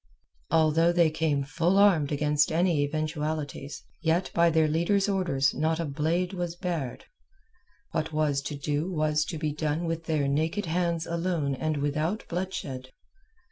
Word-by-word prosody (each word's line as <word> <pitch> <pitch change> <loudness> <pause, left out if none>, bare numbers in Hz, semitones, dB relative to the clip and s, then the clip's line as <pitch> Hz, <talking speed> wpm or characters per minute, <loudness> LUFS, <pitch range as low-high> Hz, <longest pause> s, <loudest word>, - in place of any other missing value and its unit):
Although 160 +1 +4
they 170 -2 +4
came 155 -3 0
full 170 +6 +1
armed 180 -8 +4
against 150 +1 +2
any 165 -2 +2
eventualities, 150 -1 -3 0.2
yet 165 +3 +1
by 170 0 +4
their 160 -1 +3
leader's 170 +6 +1
orders 170 -9 +1
not 160 +2 0
a 165 - -1
blade 165 +6 -1
was 175 -2 -3
bared. 170 -9 -4 0.9
What 155 +1 -2
was 150 -3 +1
to 150 - -5
do 145 +5 -2
was 155 -2 +1
to 165 - -5
be 155 -1 -2
done 155 +2 -1
with 165 0 -3
their 155 -4 0
naked 160 +8 0
hands 170 0 0
alone 170 -4 -1
and 155 +3 -1
without 155 +8 -1
bloodshed. 155 -8 -4
160 Hz, 150 wpm, -27 LUFS, 150-170 Hz, 0.9 s, Although